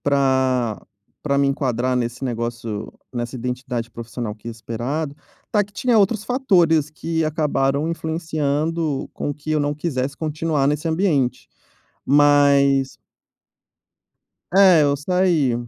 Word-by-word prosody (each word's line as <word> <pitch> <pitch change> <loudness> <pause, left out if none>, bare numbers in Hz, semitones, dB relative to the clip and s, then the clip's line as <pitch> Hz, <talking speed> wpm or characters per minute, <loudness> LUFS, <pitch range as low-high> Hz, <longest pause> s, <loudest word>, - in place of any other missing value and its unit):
Pra 130 -5 +1 0.4
pra 140 -2 +1
me 140 - +3
enquadrar 130 -2 0
nesse 120 +1 -2
negócio, 115 -3 -4 0.2
nessa 120 +1 -4
identidade 125 -1 -4
profissional 115 -1 -6
que 110 +2 -13
é - - -3
esperado, 125 +7 -4 0.4
tá 210 -1 +3
que 205 - -17
tinha 245 +3 +1
outros 210 +1 +2
fatores 175 - +2
que 165 +1 -2
acabaram 150 -2 0
influenciando 160 -2 -2
com - - -3
que 145 +2 -6
eu 155 - +2
não 145 0 0
quisesse 140 -3 -3
continuar 155 -2 -1
nesse 150 +3 0
ambiente. 150 -8 0 0.6
Mas 140 -1 +4 1.6
É, 190 -4 +7
eu 145 0 +2
saí, 170 -4 +1
145 Hz, 120 wpm, -21 LUFS, 125-160 Hz, 1.6 s, É